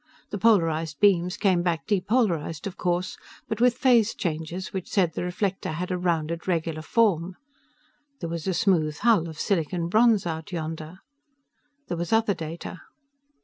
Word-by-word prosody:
The 205 - -3
polarized 165 -8 +2
beams 180 -3 +3
came 185 -4 +2
back 170 -2 -1
depolarized, 195 -7 0
of 195 -2 -5
course, 180 0 -2 0.3
but 220 0 -3
with 245 0 +4
phase 240 -4 +4
changes 165 +2 -4
which 190 -2 -4
said 180 -5 +2
the - - -3
reflector 180 -1 -2
had 180 +4 -4
a 180 - 0
rounded, 170 -1 -1
regular 165 -3 -1
form. 185 -2 +1 0.8
There 170 - -4
was 170 +1 -4
a 190 - 0
smooth 165 -8 +2
hull 205 -7 +3
of 155 -1 -10
silicon 170 -2 -1
bronze 220 0 +4
out 160 +2 -4
yonder. 160 +1 -5 0.9
There 175 - -3
was 170 0 -3
other 225 -2 +3
data. 165 +1 -7
175 Hz, 155 wpm, -26 LUFS, 165-200 Hz, 0.9 s, with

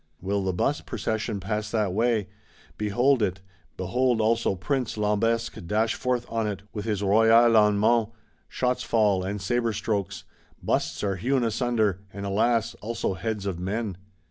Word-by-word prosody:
Will 100 +2 -1
the 95 - 0
Bust 90 - -1
Procession 110 -1 -2
pass 105 +3 -3
that 105 -4 0
way! 110 -1 +1 0.5
Behold 120 +5 +2
it; 95 -2 0 0.4
behold 120 +5 +1
also 115 -2 +2
Prince 125 +5 -2
Lambesc 110 +2 0
dash 110 +3 +1
forth 125 -1 -1
on 115 -1 -1
it, 100 -1 -4
with 105 -1 -5
his 105 -3 -1
Royal 110 +3 +4 0.2
Allemands! 105 +2 +4 0.4
Shots 125 0 0
fall, 105 -5 +2
and 100 +2 -3
sabre 115 +4 0
strokes; 105 -2 -2 0.4
Busts - - -1
are 100 -2 0
hewn 125 +6 +1
asunder; 115 -4 +1
and, 100 0 -6
alas, 110 +3 +1
also 115 -2 -2
heads 105 +3 -4
of 95 -4 -3
men. 100 +2 -3
105 Hz, 150 wpm, -26 LUFS, 100-115 Hz, 0.5 s, Royal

